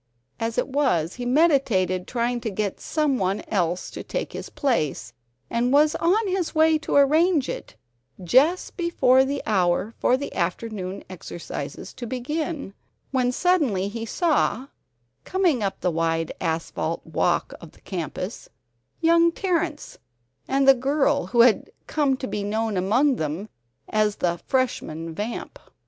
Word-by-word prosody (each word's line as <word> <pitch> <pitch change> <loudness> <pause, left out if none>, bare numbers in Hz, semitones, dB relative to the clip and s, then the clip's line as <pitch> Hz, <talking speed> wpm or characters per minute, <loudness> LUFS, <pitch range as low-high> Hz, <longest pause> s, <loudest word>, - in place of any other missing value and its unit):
As 225 0 -2
it - - +1
was, 260 - +1
he 245 0 -5
meditated 245 - +2
trying 240 0 -1
to 225 - -2
get 200 -1 -3
some 300 -5 0
one 190 +1 -1
else 180 -3 -1
to - - -6
take - - -4
his - - -6
place, 150 - -1 0.3
and 240 - 0
was 295 +2 +5
on 395 +6 +2
his 370 -3 -1
way 315 0 +4
to 300 - -3
arrange 300 +2 +4
it, - - -6 0.5
just 280 - +3
before 265 -7 +4
the 280 +1 -3
hour 190 +1 +1
for 255 - +3
the 280 - -6
afternoon 190 +1 -3
exercises 175 -1 -7
to 245 -2 -7
begin, 280 - -3 0.4
when 255 -2 +1
suddenly 250 - +1
he 225 +2 -5
saw, 275 -1 0 0.5
coming 360 - +1
up 195 -2 -2
the 180 - +1
wide 165 0 0
asphalt 165 -1 -2
walk 170 +2 0
of 165 - -12
the - - -22
campus, 185 +3 -5 0.5
young 335 +1 +5
Terrence, 335 -4 -2 0.5
and 270 0 +2
the 270 - +10
girl 280 +3 +1
who 235 - +4
had 235 -2 +4 0.2
come 285 -4 +1
to 260 - -5
be 205 - -3
known 215 +1 -1
among 240 +9 +2
them 160 +8 -3 0.4
as 215 -1 +1
the 175 -1 -1
"Freshman 165 - -1
Vamp." 210 +7 -5
245 Hz, 145 wpm, -24 LUFS, 185-290 Hz, 0.5 s, the